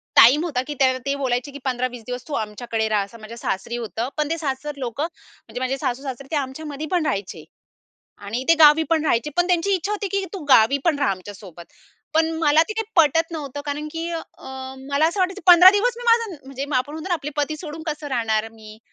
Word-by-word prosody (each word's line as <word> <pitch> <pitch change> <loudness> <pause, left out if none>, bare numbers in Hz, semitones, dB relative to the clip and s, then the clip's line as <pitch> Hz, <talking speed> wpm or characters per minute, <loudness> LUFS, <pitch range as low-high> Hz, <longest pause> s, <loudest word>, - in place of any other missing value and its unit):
Time 275 +8 +7
होता 285 -8 -1
की 295 - -3
त्याव 260 -1 +3
ते 275 - 0
बोलायचे 260 -1 -2
की 285 - -8
"15-20 250 -2 -2
दिवस 250 0 -6
तू 300 - -6
आमच्याकडे 220 +1 -3
राहा," 210 -2 +2
असं 225 +4 -12
माझ्या 225 +2 -10
सासरी 195 +2 -3
होतं. 235 +1 -4
पण 300 0 0
ते 330 - -1
सासर 295 -1 -3
लोकं 255 +1 -3
म्हणजे 325 -6 -9
माझे 260 +1 -1
सासू-सासरे 265 +1 -4
ते - - -1
आमच्यामध्ये 290 +2 -4
पण 345 -4 +1
राहायचे. 200 -7 -3 0.8
आणि 210 +5 -4
ते 330 - +7
गावी 300 +1 +8
पण 320 -1 +2
राहायचे. 255 +1 +1
पण 350 0 +3
त्यांची 360 +2 +1
इच्छा 385 +3 -2
होती 410 -1 -2
की 395 -1 0
"तू 380 -5 -6
गावी 255 +2 +6
पण 315 -4 +2
राहा 285 -7 +2
आमच्यासोबत." 185 -2 -8 0.5
पण 320 0 +3
मला 310 0 +5
ते - - -2
काही - - -2
पटत 325 +1 +4
नव्हतं 285 -3 -5
कारण 295 +1 -3
की 330 +1 -4
अ, 330 -1 -3 0.7
मला 285 +3 +3
असं 375 +4 -1
वाटायचं 375 +2 0
15 360 +1 +10
दिवस 460 +4 +1
मी 485 - -8
माझं 460 -5 +2
म्हणजे 270 0 -5
आपण 255 +4 -1
म्हणतो 320 +4 -6
ना 355 - +2
आपले 295 -3 -5
पती 295 +1 -1
सोडून 315 0 -8
कसं 300 -1 -4
राहणार 225 -3 0
मी? 215 -1 -14
285 Hz, 215 wpm, -22 LUFS, 245-325 Hz, 0.8 s, 15